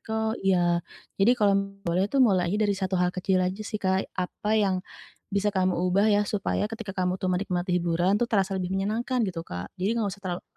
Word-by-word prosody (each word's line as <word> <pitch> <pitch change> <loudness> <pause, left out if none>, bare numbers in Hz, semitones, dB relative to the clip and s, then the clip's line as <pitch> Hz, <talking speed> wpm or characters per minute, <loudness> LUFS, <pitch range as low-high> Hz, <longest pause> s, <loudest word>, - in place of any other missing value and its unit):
kok 220 0 -2
iya, 175 -3 +2 0.4
jadi 240 +5 +5
kalau 205 -3 +3 0.3
boleh 180 +4 +1
tuh 270 0 +4
mulai 185 -5 +2
aja 205 - 0
dari 205 - +2
1 190 -1 -1
hal 180 0 +1
kecil 185 0 0
aja 185 +3 -2
sih 215 0 -4
Kak, 190 0 0
apa 185 +3 -3
yang 190 -3 +2 0.5
bisa 200 +1 +1
kamu 185 -1 +2 0.2
ubah 200 +3 +3
ya, 205 0 +4
supaya 205 0 -1
ketika 225 -3 -6
kamu 185 0 0
tuh 185 - -1
menikmati 180 -1 -1
hiburan 175 +3 +1
tuh 240 - +2
terasa 195 -2 +1
lebih 180 -1 -3
menyenangkan 225 +6 -1
gitu 165 -2 -5
Kak, 90 0 -7
jadi 200 +4 +1
enggak 210 -3 0
usah - - -21
terlalu 180 -1 -4
190 Hz, 210 wpm, -26 LUFS, 180-210 Hz, 0.5 s, jadi